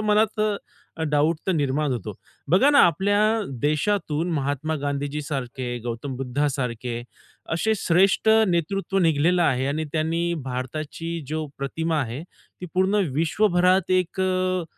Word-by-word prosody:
मनात 215 +1 +2 0.7
डाउट 150 +3 +2
तर 190 - +2
निर्माण 145 -2 0
होतो. 120 -6 -5 0.3
बघा 195 - +5
ना 285 - +5
आपल्या 195 +5 +1 0.4
देशातून 160 +1 0
महात्मा 145 +2 -1
गांधीजीसारखे, 140 -3 -3
गौतम 120 +3 -4
बुद्धासारखे 125 -3 -2 0.5
असे 220 +7 +1
श्रेष्ठ 195 +3 +3 0.2
नेतृत्व 195 +3 0
निघालेलं 170 +1 +3
आहे 130 -3 +1
आणि 155 +3 -1
त्यांनी 165 +2 0
भारताची 155 +6 -4
जो 155 0 -2
प्रतिमा 160 +3 -1
आहे. 130 +3 -4
ती 180 0 -14
पूर्ण 190 +2 +2 0.2
विश्वभरात 180 +3 +2
एक 185 0 +1
अ, 185 -1 0
160 Hz, 120 wpm, -24 LUFS, 140-185 Hz, 0.7 s, बघा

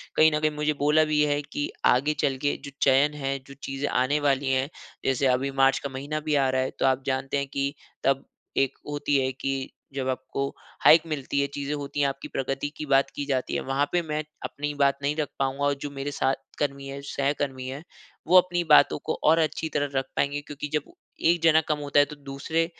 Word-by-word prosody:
कहीं 155 0 +6
न - - +1
कहीं 155 0 +1
मुझे 150 0 0
बोला 150 +2 +5
भी 155 -1 +2
है 145 0 +1
कि 145 0 -4 0.2
आगे 140 +5 +4
चल 135 -1 +1
के 145 - +2
जो - - -8
चयन 140 +2 +4
है 135 0 0
जो 140 - -10
चीज़े 135 +1 -3
आने 130 +4 +1
वाली 135 -1 +2
हैं, 130 +1 +1 0.4
जैसे 135 +1 +2
अभी 130 +2 +1
मार्च 135 0 +5
का 140 - -5
महीना 140 +3 -4
भी 150 - +3
आ 135 -2 +3
रहा 130 0 +1
है 130 - -2
तो - - +2
आप 130 0 +2
जानते 135 +1 -1
है 140 - 0
कि 140 0 -2 0.3
तब 135 0 +1 0.3
एक 135 0 +1
होती 145 -1 +1
है 130 - 0
कि 135 0 -3 0.2
जब 135 -1 -2
आपको 130 +1 -2 0.4
हाइक 160 +1 +9
मिलती 140 -2 -2
है, 140 - +1
चीज़े 140 +1 -4
होती 145 0 -4
है, - - +4
आपकी 135 0 -5
प्रगति 135 +2 -2
की 155 - -4
बात 135 -1 +3
की 145 - -3
जाती 130 -3 -1
है। - - 0
वहाँ 135 +2 0
पे 175 - +2
मैं 155 -2 -3 0.2
अपनी 145 +1 -3
बात 140 -1 +4
नहीं 145 +1 +1
रख 150 -2 -1
पाऊँगा। 135 +1 -1
और 145 - +3
जो 145 - -3
मेरे 140 +1 -4
साथ 135 -1 +1 0.2
कर्मी 140 -1 -2
है, 135 0 -6
जो 140 - -11
सहकर्मी 140 -2 -1
है 135 +4 -6 0.4
वो 180 +3 +7
अपनी 175 -1 +3
बातों 150 - +7
को - - 0
और 160 +2 +5
अच्छी 160 0 0
तरह 145 -1 0
रख 135 0 +1
पाएँगे। 140 +1 0
क्योंकि 145 0 -6
जब 150 -2 -1 0.4
1 170 -1 0
जना 160 -1 +6
कम 155 - +1
होता 145 0 +2
है 145 - +6
तो 150 +1 -10 0.2
दूसरे 160 +4 0
140 Hz, 230 wpm, -26 LUFS, 135-150 Hz, 0.4 s, हाइक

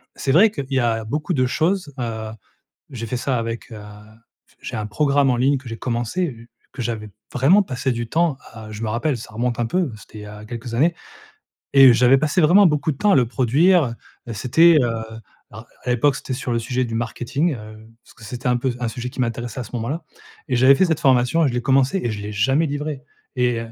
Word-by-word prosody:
c'est 135 - -1
vrai 200 +8 +6
qu'il 140 -10 -5
y 135 - +2
a 115 -2 0
beaucoup 150 - -2
de 130 -4 +2
choses, 160 +3 -1
heu, 110 -2 -4 0.6
j'ai 115 -2 -6
fait 125 - -3
ça 130 0 -1
avec, 115 +1 -5
heu, 110 -2 -9 0.8
j'ai - - -6
un 105 - -3
programme 140 +3 +2
en 125 - +1
ligne 135 +3 +2
que 130 -1 -11
j'ai 115 - -6
commencé, 120 +1 -3 0.2
que 125 - -7
j'avais 110 -2 -4 0.2
vraiment 160 +12 +4
passé 130 -6 -2
du 120 -1 -3
temps 160 +1 +1 0.2
à 110 -1 -10
je 110 +1 -7
me 110 - -2
rappelle 120 +4 -1
ça 110 - -11
remonte 120 +1 -2
un 120 - +1
peu, 175 +1 -1
c'était 105 +1 -13
il - - -9
y - - -9
a 105 0 -10
quelques 115 +1 -7
années 165 +7 +2 0.8
et 135 -2 +9
j'avais 125 +3 +5
passé 155 +5 +1
vraiment 190 +5 +6
beaucoup 150 0 +1
de - - -10
temps 210 -1 +3
à - - +5
le 125 - +3
produire, 135 +4 +2 0.4
c'était, 160 +10 +4
heu, 120 - +2 0.6
alors - - -11 0.2
à - - -2
l'époque, 135 +3 +2
c'était 130 - -5
sur 125 -1 -4
le 120 - +1
sujet 125 +2 -1
du 115 -2 -5
marketing, 125 +7 -1
heu, 110 0 -12 0.2
parce - - -19
que 115 - -15
c'était 125 +4 -7
un 125 - +3
peu 125 0 -1
un 120 - -1
sujet 125 +2 -5
qui 135 - -7
m'intéressait 120 0 -3
à - - -4
ce 110 - -13
moment-là 135 +8 -3 0.4
et 125 - 0
j'avais 130 +3 +6
fait 190 - +4
cette 160 -3 -1
formation 130 +5 +3
et - - +2
je 120 - -3
l'ai 120 - -1
commencé 135 +8 +2
et 120 - 0
je 105 - -5
l'ai 105 - -6
jamais 135 +10 +2
livrée 145 -1 -4 0.3
et 125 -1 +1
125 Hz, 230 wpm, -21 LUFS, 115-145 Hz, 0.8 s, et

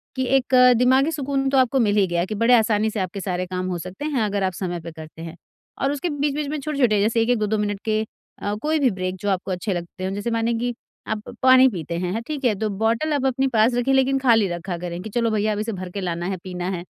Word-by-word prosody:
कि 260 -1 -1
एक 260 0 0 0.2
दिमागी 260 +5 +3
सुकून 275 -2 -1
तो 270 - +2
आपको 260 +1 +3
मिल 210 -4 +2
ही 195 -2 +4
गया 175 0 0
कि 215 - -5
बड़े 230 +4 +3
आसानी 220 -1 +2
से 215 - -3
आपके 190 +1 -3
सारे 185 -1 -2
काम 185 0 -3
हो 180 - -2
सकते 185 - -7
हैं 290 -6 0
अगर 205 -2 -1
आप 185 -1 0
समय 175 -1 -4
पर 165 +1 -8
करते 160 0 -11
हैं। 165 0 -7 0.5
और 275 - +2
उसके 290 +4 -2
बीच-बीच 290 0 -1
में 305 0 -3
छोटे-छोटे 265 -7 +1
जैसे 225 +2 +2
1-1, 240 +2 +2
2-2 215 0 0
मिनट 205 -1 -2
के 215 -1 +1 0.4
अ, 205 - -2
कोई 310 +1 +1
भी 270 -3 +4
ब्रेक 185 -1 -3
जो 205 - -1
आपको 190 0 -1
अच्छे 185 +3 -2
लगते 175 +2 -6
हों, 190 - -2
जैसे 205 +4 -3
माने 230 +1 0
कि 240 +1 -1 0.3
आप 220 -1 -2 0.2
पानी 260 0 +7
पीते 170 -5 -5
हैं 180 0 -2
हैं 225 - -2
ठीक 290 -3 -4
है 235 - +4
तो 220 - 0
बॉटल 230 +8 +1
आप 280 -2 0
अपने 265 +1 +1
पास 220 +3 +4
रखें 245 +2 +1
लेकिन 265 0 +3
खाली 230 -6 +4
रखा 175 +1 -4
करें 175 0 -5
कि 220 - -7
चलो 230 +1 0
भैया 215 0 +1
अब 205 - -3
इसे 220 +2 -2
भरकर 185 +1 -6
लाना 175 -1 -3
है, 190 -1 -2
पीना 180 -1 -4
है। 180 -3 -4
215 Hz, 260 wpm, -22 LUFS, 185-260 Hz, 0.5 s, पानी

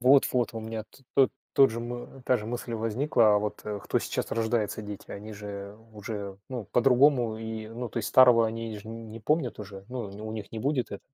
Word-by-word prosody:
Вот-вот, 125 -2 +4
у 115 - -3
меня 110 0 -5 0.3
то 135 -1 +6 0.2
тот 135 -2 +6
же, 115 +1 -4
мы 120 +2 -7
та 125 - +4
же 105 -1 -6
мысль 120 0 -4
возникла. 115 0 +3
А - - +5
вот, 105 0 -3
э, 105 -1 -4
кто - - +1
сейчас - - -3
рождается- 110 -1 0
дети- 105 -1 -8
они 105 +2 -7
же 100 -1 -7 0.2
уже, 105 -2 -6
ну, 125 -4 -4
по-другому, 125 -2 +4
и, 110 -1 -5
ну, 120 +2 -5
то 120 - -4
есть, 110 - -2
старого 120 -3 +7
они 115 -1 -4
ж 105 - -14
не 115 0 -8
помнят 140 +1 0
уже, 100 -2 -8
ну, 125 -5 -4
не 105 +2 -9
у 110 - -5
них 110 -2 -6
не 110 - -4
будет 135 +1 0
это. 100 - -5
115 Hz, 215 wpm, -28 LUFS, 105-120 Hz, 0.3 s, старого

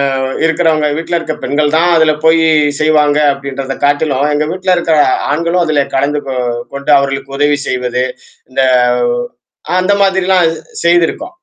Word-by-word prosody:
அ, - - -2 0.3
இருக்குறவங்க, 160 -2 +1
வீட்ல 165 +1 -2
இருக்கிற 155 -2 -5
பெண்கள் 145 +2 0
தான் 170 +2 +2
அதுல 160 -1 +3
போய் 160 0 +4 0.4
செய்வாங்க, 150 -1 +2
அப்படின்றத 135 -1 -6
காட்டிலும், 145 -1 +1
எங்க 150 +1 0
வீட்டுல 185 0 0
இருக்கற 165 -2 +1 0.3
ஆண்களும் 170 +4 0
அதுல 150 -3 +1
கலந்து 145 +2 0
கொ 135 - -3 0.4
கொண்டு 140 +1 -2
அவர்களுக்கு 135 0 -4
உதவி 145 0 +2
செய்வது, 125 0 -1 0.5
இந்த 130 - 0 1.2
அந்த 185 +2 +1
மாதிரிலாம் 190 -2 +2 0.4
செய்திருக்கோம். 175 - +1
150 Hz, 135 wpm, -13 LUFS, 140-170 Hz, 1.2 s, போய்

